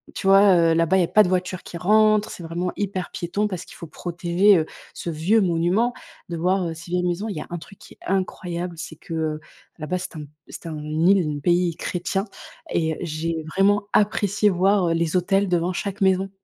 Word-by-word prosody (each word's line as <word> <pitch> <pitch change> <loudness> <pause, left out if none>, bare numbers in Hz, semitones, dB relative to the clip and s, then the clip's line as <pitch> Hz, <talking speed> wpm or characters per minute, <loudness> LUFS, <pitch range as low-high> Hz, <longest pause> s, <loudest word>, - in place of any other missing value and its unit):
Tu - - -3
vois, 195 0 +7
heu, 165 -1 +4
là-bas 165 +3 +3
il - - +4
y - - +4
a - - 0
pas 215 - +5
de 180 - -1
voiture 185 0 -1
qui 170 - -8
rentre 215 +3 +3
c'est 175 - -9
vraiment 175 +2 -3
hyper 195 -2 -3
piéton, 200 +5 -2
parce 185 -3 -6
qu'il - - -14
faut - - -9
protéger, 175 +4 +2
heu, 160 - +1 0.3
ce - - -6
vieux 170 +8 +2
monument. 185 +7 +1 0.4
De 170 - -4
voir, 185 +2 +1
heu, 165 - -4
ces 170 +2 -11
vieilles 180 0 0
maisons, 180 +5 -1
il 205 - -4
y 150 - -4
a - - -9
un 175 - -4
truc 190 +4 -13
qui - - -14
est - - -43
incroyable, 180 -2 -2
c'est 165 - -7
que, 165 - -10
heu, 155 -1 -2 0.4
là-bas, 160 +4 -3
c'est 185 -1 -7
un 150 -1 -6 0.2
c'est - - -11
un 160 -2 -5
île, 160 +1 +2
le - - -5
pays 175 +3 +2
est 165 - -8
chrétien 190 +2 -2 0.5
et 160 -2 0
j'ai 160 0 -3
vraiment 205 +1 +3
apprécié 210 0 +2
voir, 190 0 +2
heu, 165 - +2
les 165 0 -1
autels 195 +2 +2
devant 175 +1 +1
chaque 200 +2 -4
maison. 190 0 +2
180 Hz, 225 wpm, -23 LUFS, 165-195 Hz, 0.5 s, vois